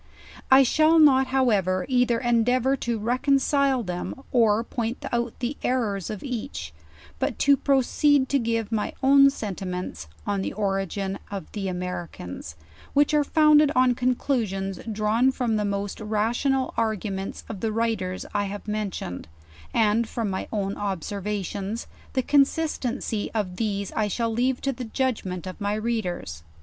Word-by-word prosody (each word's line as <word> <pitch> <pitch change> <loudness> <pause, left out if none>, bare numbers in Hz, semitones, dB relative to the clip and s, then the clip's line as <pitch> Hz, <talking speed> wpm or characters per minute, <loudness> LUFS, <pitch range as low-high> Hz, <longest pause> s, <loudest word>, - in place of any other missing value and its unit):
I 265 +1 +8
shall 315 +5 +4
not 265 -4 +6
however, 200 -9 +2
either 245 -2 +2
endeavor 245 +2 +2
to 235 -3 -2
reconcile 270 +3 +2
them 180 -2 -4 0.2
or 225 -2 +3
point 235 0 -4
out 235 -1 -1
the 255 +3 -3
errors 215 -7 -1
of 210 -3 -6
each, 220 - -5 0.5
but - - -1
to 280 0 +5
proceed 275 +1 +3
to 280 - +2
give 230 -2 -1
my 215 -2 -1
own 275 +1 +7
sentiments 185 - -5 0.2
on 200 -1 -1
the - - -3
orig 195 -2 -1
in 195 0 -2
of 200 -2 -6
the 200 -2 -3
Americans; 175 - -5 0.4
which 290 +1 +3
are 300 -1 +4
founded 305 0 +5
on 255 0 +4
conclusions 230 -7 -1
drawn 220 +5 +2
from 240 -4 -1
the 210 - 0
most 200 0 -3
rational 235 +5 0
arguments 205 -3 -2
of 215 -4 -6
the 220 +1 -1
writers 215 -5 -1
I 205 -1 +1
have 205 +2 -6
men 210 -1 -1
tioned, 90 - -6 0.5
and 225 +1 +2
from 225 -4 -2
rny 190 - -3
own 200 -2 -2
observations; 200 +2 -3 0.3
the 260 - +1
consistency 275 -6 +1
of 185 -4 -2
these 200 -3 -2
I 215 -1 0
shall 230 +2 -1
leave 250 +2 0
to 275 - 0
the 250 0 -6
judgement 220 -8 -2
of 185 +3 -8
my 205 +1 0
readers. 215 - -3
225 Hz, 150 wpm, -25 LUFS, 200-255 Hz, 0.5 s, I